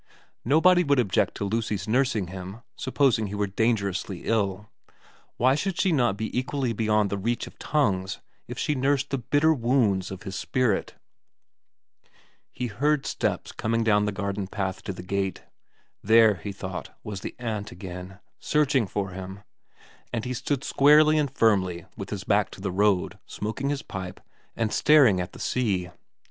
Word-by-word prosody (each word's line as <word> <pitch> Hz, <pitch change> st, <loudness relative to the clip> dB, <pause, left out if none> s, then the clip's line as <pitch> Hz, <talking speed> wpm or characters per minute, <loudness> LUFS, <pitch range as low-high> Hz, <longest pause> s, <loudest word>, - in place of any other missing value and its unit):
Nobody 175 Hz, +7 st, +5 dB
would 140 Hz, -3 st, +2 dB
object 105 Hz, -7 st, +1 dB
to -, -, -3 dB
Lucy's 105 Hz, -2 st, -2 dB
nursing 110 Hz, -5 st, +1 dB
him, 95 Hz, +4 st, -8 dB
supposing 130 Hz, -5 st, +1 dB
he 100 Hz, -, -5 dB
were 105 Hz, 0 st, 0 dB
dangerously 100 Hz, -3 st, -1 dB
ill; 105 Hz, -2 st, 0 dB, 0.7 s
why 130 Hz, +2 st, +4 dB
should 175 Hz, +5 st, -2 dB
she 190 Hz, -, +3 dB
not 120 Hz, -9 st, +2 dB
be 110 Hz, +1 st, -4 dB
equally 130 Hz, -1 st, -1 dB
beyond 105 Hz, -2 st, +1 dB
the 100 Hz, -, -1 dB
reach 120 Hz, +5 st, -1 dB
of -, -, -14 dB
tongues 95 Hz, -10 st, 0 dB, 0.3 s
if -, -, -7 dB
she 150 Hz, -, 0 dB
nursed 140 Hz, +1 st, 0 dB
the 135 Hz, -, 0 dB
bitter 145 Hz, +6 st, +3 dB
wounds 115 Hz, -, +1 dB
of 95 Hz, -1 st, -8 dB
his 95 Hz, -2 st, -6 dB
spirit? 125 Hz, -3 st, 0 dB, 1.6 s
He 125 Hz, -, -4 dB
heard 140 Hz, +6 st, 0 dB
steps -, -, -2 dB
coming 115 Hz, +1 st, -1 dB
down 105 Hz, -2 st, +3 dB
the 105 Hz, -, 0 dB
garden 100 Hz, 0 st, -3 dB
path 95 Hz, -1 st, -3 dB
to -, -, -2 dB
the 90 Hz, -2 st, -8 dB
gate. 95 Hz, +1 st, -2 dB, 0.6 s
There, 110 Hz, +1 st, +6 dB
he 100 Hz, +2 st, -6 dB
thought, 95 Hz, -1 st, -6 dB
was 100 Hz, -3 st, -6 dB
the -, -, -6 dB
aunt 110 Hz, -4 st, -4 dB
again, 90 Hz, +1 st, -8 dB, 0.2 s
searching 140 Hz, -6 st, +2 dB
for 95 Hz, 0 st, -3 dB
him, 95 Hz, +1 st, -8 dB, 0.7 s
and 115 Hz, -2 st, -3 dB
he 125 Hz, -, -2 dB
stood 135 Hz, +2 st, -2 dB
squarely 150 Hz, +2 st, +5 dB
and 145 Hz, -2 st, +1 dB
firmly 95 Hz, -8 st, +1 dB
with 100 Hz, -, -7 dB
his 100 Hz, -3 st, -4 dB
back 105 Hz, 0 st, +2 dB
to -, -, -11 dB
the 95 Hz, 0 st, -3 dB
road, 100 Hz, 0 st, +1 dB
smoking 110 Hz, +6 st, -3 dB
his 145 Hz, -1 st, -2 dB
pipe 95 Hz, -1 st, -7 dB, 0.4 s
and 110 Hz, -2 st, -1 dB
staring 135 Hz, -12 st, +5 dB
at 90 Hz, -, -6 dB
the -, -, -11 dB
sea. 95 Hz, -8 st, -1 dB
110 Hz, 165 wpm, -26 LUFS, 95-130 Hz, 1.6 s, There